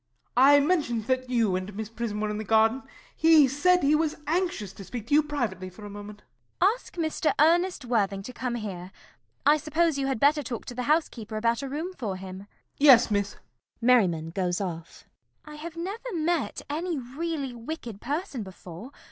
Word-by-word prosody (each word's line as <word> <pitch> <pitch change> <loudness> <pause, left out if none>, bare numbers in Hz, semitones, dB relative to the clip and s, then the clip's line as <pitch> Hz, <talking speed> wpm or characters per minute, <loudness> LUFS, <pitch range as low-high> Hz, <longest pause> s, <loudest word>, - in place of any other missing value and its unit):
I 275 +3 +7
mentioned 285 - +1
that 255 +1 -1
you 230 -6 +2
and 185 +2 -4
Miss 220 0 -4
Prism 225 -2 -4
were 215 0 -1
in 210 - -4
the - - -3
garden. 220 +4 +3 0.3
He 320 -3 +6
said 360 +7 +3
he 285 +2 +4
was 310 0 +1
anxious 315 - -1
to 195 - -10
speak 230 +2 -7
to 265 - -3
you 300 - +7
privately 240 - -3
for 205 +3 -12
a 205 - -8
moment. 205 +1 -10 0.4
CECILY. 385 +4 +5
Ask - - -15
Mr. 315 -2 0
Ernest 340 0 +3
Worthing 200 -5 0
to 255 - -8
come 250 -1 -3
here. 190 -5 -6 0.5
I 295 +1 +6
suppose 310 0 0
you 270 - 0
had 265 -4 -1
better 295 +3 +4
talk 245 -5 -6
to - - -7
the 250 +2 -4
housekeeper 235 -9 0
about 230 +2 +1
a 275 - -5
room 320 +7 -4
for 220 - -4
him. 185 0 -8
MERRIMAN. 195 +1 -12 0.3
Yes, 260 -6 +7
Miss. 200 -1 0 0.4
[Merriman 190 -10 +3
goes 180 -1 -1
off.] 170 -4 -5 0.5
CECILY. 300 - -10
I - - -9
have 330 +2 -8
never 405 +8 -5
met 330 -1 -1
any 330 +3 -2
really 275 +1 -4
wicked 235 -3 -7
person 290 - -3
before. 190 +2 -10
250 Hz, 195 wpm, -27 LUFS, 210-305 Hz, 0.5 s, I